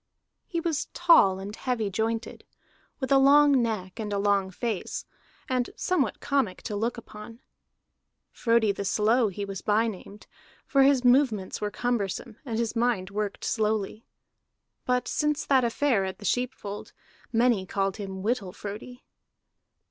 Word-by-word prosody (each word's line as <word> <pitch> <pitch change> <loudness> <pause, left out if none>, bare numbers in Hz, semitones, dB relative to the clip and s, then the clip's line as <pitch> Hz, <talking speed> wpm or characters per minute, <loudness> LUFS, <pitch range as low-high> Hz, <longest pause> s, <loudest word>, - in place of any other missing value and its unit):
He 340 - -2
was 325 -3 -1
tall 335 - +5
and 200 +2 -7
heavy 225 -6 -2
jointed, 225 +3 -2 0.6
with 265 -1 -3
a 275 - +6
long 280 0 +6
neck 215 -4 -3
and 210 -2 -4
a 200 - 0
long 200 -1 +2
face, 215 +1 -4 0.4
and 255 -2 0
somewhat 320 - 0
comic 265 -10 -1
to 210 - -4
look 230 +4 -1
upon. 225 0 -11 0.9
Frodi 230 -3 +2
the 200 - -4
Slow 225 +5 +2
was 195 - -7
he 205 - -3 0.2
by 215 +1 +3
named, 210 -1 -7 0.4
for 275 - +3
his 270 -2 +4
movements 245 -6 +2
were 210 - -1
cumbersome 215 -2 -2
and 230 -4 -3
his 230 0 -1
mind 230 -5 0
worked 210 0 -3
slowly. 215 0 -1 0.8
But 250 -1 0
since 300 0 0
that 265 -2 +4
affair 235 -2 +1
at 190 0 -4
the 205 - -11
sheep 250 +4 0
fold, 205 0 -8 0.4
many 230 -5 +2
called 195 0 -1
him 190 -2 -6
Whittle 210 -5 -1
Frodi. 220 +5 -8
225 Hz, 150 wpm, -27 LUFS, 200-250 Hz, 0.9 s, a